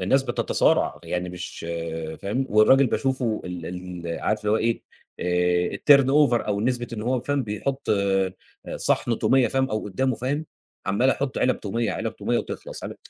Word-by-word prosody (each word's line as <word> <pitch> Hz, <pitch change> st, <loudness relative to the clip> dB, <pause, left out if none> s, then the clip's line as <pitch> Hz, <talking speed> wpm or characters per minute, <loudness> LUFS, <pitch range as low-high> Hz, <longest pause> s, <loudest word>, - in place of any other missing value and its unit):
الناس 135 Hz, +9 st, +3 dB
بتتصارع 120 Hz, -3 st, +1 dB
يعني 90 Hz, 0 st, -2 dB
مش 90 Hz, -1 st, -7 dB, 0.6 s
فاهم 125 Hz, +7 st, -1 dB
والراجل 130 Hz, +6 st, +6 dB
باشوفه 125 Hz, -3 st, 0 dB
ال 90 Hz, -2 st, -6 dB, 0.4 s
ال 85 Hz, -, -4 dB
عارف 105 Hz, 0 st, -1 dB
هو 105 Hz, +1 st, +3 dB
إيه، 115 Hz, +1 st, 0 dB, 0.4 s
آآ 90 Hz, 0 st, +1 dB
الturn 140 Hz, -2 st, +6 dB
over 135 Hz, -4 st, +3 dB
أو 100 Hz, -1 st, 0 dB
نسبة 120 Hz, +1 st, 0 dB
إن 105 Hz, -2 st, -4 dB
هو 125 Hz, +1 st, 0 dB
فاهم 145 Hz, 0 st, -1 dB
بيحط 130 Hz, +6 st, -4 dB
آآ، 95 Hz, -2 st, +1 dB, 0.4 s
صِحن 115 Hz, -2 st, +1 dB
تومية 130 Hz, -2 st, +3 dB
فاهم 135 Hz, 0 st, 0 dB
أو 110 Hz, -, -2 dB
قدامه 125 Hz, +6 st, 0 dB
فاهم، 145 Hz, +5 st, -2 dB, 0.4 s
عَمّال 105 Hz, +7 st, +2 dB
يحط 135 Hz, -1 st, -2 dB
علب 130 Hz, -, +1 dB
تومية 115 Hz, +2 st, -1 dB
علب -, -, -4 dB
تومية -, -, 0 dB
وتخلص -, -, -6 dB
علب -, -, -6 dB
115 Hz, 165 wpm, -24 LUFS, 100-130 Hz, 0.6 s, والراجل